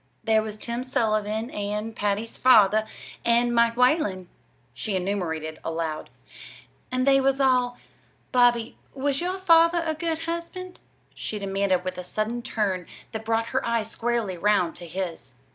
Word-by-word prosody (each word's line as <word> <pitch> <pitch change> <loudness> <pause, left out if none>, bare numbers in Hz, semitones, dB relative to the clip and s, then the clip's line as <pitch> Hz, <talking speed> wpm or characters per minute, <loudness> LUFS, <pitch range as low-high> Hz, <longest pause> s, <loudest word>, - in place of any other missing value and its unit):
"There 220 -1 +3
was 215 -1 -6
Tim 235 +3 -4
Sullivan 220 -2 0
and 210 +2 -3
Patty's 210 +2 -1
father 215 -4 +5 0.4
and 235 +1 +3
Mike 235 0 +3
Whalen," 250 - +2 0.4
she 210 -3 -3
enumerated 165 -5 -2
aloud. 160 -1 -3 0.8
"And 255 0 +1
they 270 -1 +5
was 270 0 +2
all 250 -2 +2 0.5
Bobby, 240 -2 +3 0.2
was 275 +1 -1
your 365 +2 -1
father 335 -2 +5
a 315 - 0
good 325 0 -3
husband?" 340 +2 -5 0.3
she 215 - -5
demanded 195 -2 0
with 185 0 -4
a - - -5
sudden 215 +6 -2
turn 195 -6 -2 0.2
that 220 -1 -5
brought 225 0 0
her 265 - +1
eyes 230 -2 -1
squarely 230 -7 -1
round 200 -4 +2
to 175 - -8
his. 165 -8 -5
225 Hz, 145 wpm, -25 LUFS, 200-255 Hz, 0.8 s, father